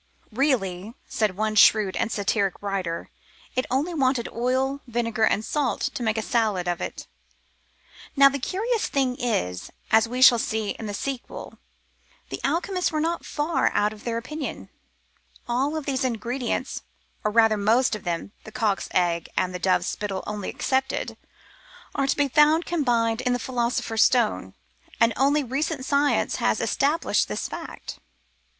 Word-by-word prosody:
Really, 220 -5 0
said 210 -4 -1
one 215 0 0
shrewd 210 -2 +5
and 225 - -1
satiric 200 -2 0
writer, 190 -4 -3 0.4
it 255 - 0
only 285 +8 0
wanted 260 -5 +1
oil, 260 +3 -1
vinegar, 230 -2 0
and 215 - +1
salt, 275 -8 -1
to - - -5
make 220 -1 0
of 220 - -1
it - - -8
a - - -10
salad. 190 -8 -1 1.1
Now 275 0 +8
the 280 0 0
curious 435 - -1
thing 265 -3 0
is 90 - -2
— - - -29
as 220 +1 +5
we 250 +2 +1
shall 240 -2 +8
see 220 -2 -1
in 220 - -6
the 205 - -4
sequel 270 +3 -6 0.3
— - - -35
the - - -5
alchemists 365 +2 0
were 310 - -1
not 335 +2 -2
far 305 +3 +1
out 210 +1 +2
in 215 - -13
their 230 +1 -3
opinion. 285 +5 -6 0.8
All 270 +6 0
these 275 -3 -2
ingredients, 245 +1 -2 0.4
or 210 - +2
rather 225 0 +4
most 225 +6 +2
of 215 - -4
them 175 +3 -3
— - - -35
the 215 - -11
cock's 220 -4 0
egg 170 -2 +1
and 185 0 +1
the 180 - -4
dove's 185 +1 +2
spittle 200 -2 -3
only 210 -2 -4
excepted 265 0 -1 0.4
— - - -23
are 275 - 0
to - - +1
be 290 -1 +3
found 305 +4 +4
combined 240 -8 +1
in 250 -1 +1
the - - +1
Philo 240 -1 -1
sopher's 225 -2 -1
Stone, 240 -4 +2 0.4
and 230 0 +4
only 285 +3 +3
recent 270 +2 -2
science 285 +1 +1
has - - +1
established 295 +4 +1
this - - -3
fact. - - -8
240 Hz, 170 wpm, -25 LUFS, 215-275 Hz, 1.1 s, Now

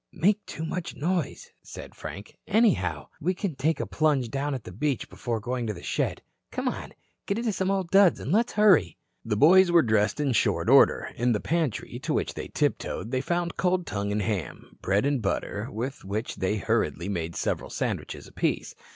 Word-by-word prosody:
"Make 205 +4 +2
too 160 - -5
much 170 +1 -4
noise," 170 +1 -2
said - - -10
Frank. 100 +2 -9
"Anyhow, 135 - +2
we 180 +4 0
can 195 -3 -2
take 145 +3 0
a - - -1
plunge 145 -7 +1
down 140 +1 -1
at 125 - -6
the - - -9
beach 135 +7 -1
before 120 -3 -3
going 120 +2 -3
to 105 - -2
the 90 - -11
shed. - - -1 0.3
Come - - -3
on, - - -4 0.3
get 200 - 0
into 230 -2 -1
some 190 0 -1
old 190 -3 -1
duds 195 -3 +6
and 140 - -4
let's 230 +5 +2
hurry." 185 - +4 0.3
The 110 -2 -1
boys 180 - +6
were 170 -2 +6
dressed 110 +1 +1
in 145 -2 +1
short - - +2
order. - - +5
In 120 +1 +2
the 105 - 0
pantry, 160 -4 -2
to - - -2
which - - -1
they - - -6
tiptoed, 110 +6 -2
they 130 -1 0
found 175 +3 -2
cold 180 -1 +1
tongue 100 0 -3
and 105 0 0
ham, 100 -6 -4
bread 100 +5 +1
and 140 -3 +1
butter, 105 +2 -2
with 130 +3 -5
which 105 +4 -4
they 100 +3 0
hurriedly 95 -6 0
made 85 -4 -3
several - - -2
sandwiches - - -3
apiece. - - -2
135 Hz, 195 wpm, -27 LUFS, 105-175 Hz, 0.3 s, duds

